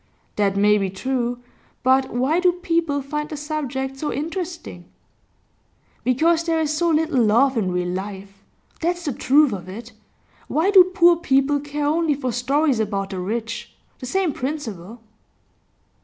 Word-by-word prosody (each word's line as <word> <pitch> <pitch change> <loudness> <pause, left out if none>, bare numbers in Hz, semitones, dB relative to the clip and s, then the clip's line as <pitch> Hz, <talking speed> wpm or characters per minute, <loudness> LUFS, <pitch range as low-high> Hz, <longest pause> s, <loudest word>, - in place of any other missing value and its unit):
'That 200 -1 +1
may 210 +1 +4
be 195 -1 -1
true. 245 +4 -2 0.5
But 260 +1 +3
why 265 +8 +1
do 360 -1 +3
people 330 -5 -1
find 300 +2 -4
the 305 - -5
subject 275 -3 -4
so 295 +2 -3
interesting?' 330 - -5 1.2
'Because 320 +7 +2
there 330 -1 +1
is 305 -1 0
so 340 +2 +1
little 310 -5 +2
love 245 +5 +3
in 200 -5 0
real 180 0 -1
life. 195 +1 -7 0.4
That's 350 +1 -2
the 285 - -1
truth 285 +1 +3
of 185 -2 -7
it. 225 +5 -9 0.6
Why 335 +6 +1
do 375 -3 +8
poor 350 -2 +4
people 285 -3 +2
care 290 +1 -4
only 310 0 +1
for 255 -2 -3
stories 270 +2 +1
about 200 -2 -2
the 190 - -4
rich? 225 +5 -4 0.2
The 255 - -7
same 370 +1 0
principle. 235 - -5
270 Hz, 155 wpm, -22 LUFS, 220-315 Hz, 1.2 s, do